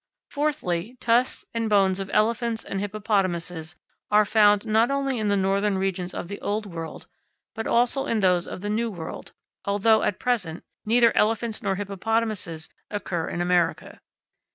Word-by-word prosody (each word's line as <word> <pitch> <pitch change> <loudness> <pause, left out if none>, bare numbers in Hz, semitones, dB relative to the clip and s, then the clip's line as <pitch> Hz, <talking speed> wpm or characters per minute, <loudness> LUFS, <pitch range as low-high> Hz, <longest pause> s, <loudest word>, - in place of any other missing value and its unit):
Fourthly, 255 - -2
tusks 240 +2 +1
and 230 -1 -1
bones 195 -2 +3
of 195 0 -4
elephants 230 +1 +1
and 195 - -4
hippopotamuses 185 -5 -2 0.3
are 210 0 +5
found 205 -1 +4
not 220 +2 +3
only 275 -3 0
in 215 - 0
the 200 0 +2
northern 195 +1 +1
regions 190 -1 -2
of - - -4
the 200 +2 -7
old 210 +1 -2
world, 165 -4 -7 0.5
but 225 - -4
also 245 +4 +2
in 230 - +1
those 180 -3 +2
of - - -7
the 205 - -3
new 230 +2 0
world, 170 -6 -7 0.3
although, 205 +2 +3
at 195 - 0
present, 200 -10 -1 0.2
neither 230 0 +4
elephants 225 +1 +1
nor 195 -1 0
hippopotamuses 200 -4 -2 0.2
occur 180 -5 -3
in 175 - -3
America. 175 -2 0
205 Hz, 155 wpm, -25 LUFS, 185-225 Hz, 0.5 s, are